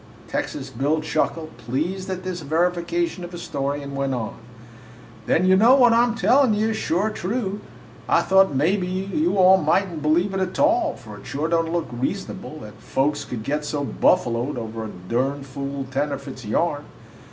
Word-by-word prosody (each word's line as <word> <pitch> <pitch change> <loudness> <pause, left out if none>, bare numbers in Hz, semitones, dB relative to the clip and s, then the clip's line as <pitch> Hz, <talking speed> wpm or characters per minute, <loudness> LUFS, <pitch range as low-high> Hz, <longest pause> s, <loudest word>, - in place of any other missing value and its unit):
Texas - - -4
Bill 145 +6 0
chuckled, 155 -2 -2
pleased 155 - -3
at 185 -1 -4
this 180 -2 -4
verification 170 +2 0
of 175 +1 -8
his 175 - -6
story, 140 0 -2
and 140 0 -7
went 135 -1 -1
on: 110 -3 -4 0.9
"Then 175 - +3
you 185 0 +6
know 230 +7 +6
what 245 -4 +6
I 230 - +5
'm 240 -1 +1
tellin' 250 -1 +4
you 215 +1 +1
is 220 - -1
sure 205 +1 0
true! 205 0 -3 0.5
I - - +4
thought 190 -5 +4
mebbe 180 +8 +2
you 195 - -1
all 190 0 +7
mightn't 170 0 0
believe 170 +6 +2
it, 190 - -1
a 190 - +1
tall, 325 - +2
for 110 -3 -11
it - - -13
sure 145 +3 -2
don't 165 -1 +1
look 170 -2 0
reasonable 120 +2 -4
that - - -11
folks 145 +2 0
could 115 -3 -5
get 150 +4 -1
so 150 -1 -2
buffaloed 130 -4 +1
over 110 -1 -5
a - - -6 0.2
durn 135 +5 0
fool 140 0 -5
tenderfoot's 140 -2 -3
yarn. 145 +5 0
165 Hz, 180 wpm, -23 LUFS, 140-190 Hz, 0.9 s, all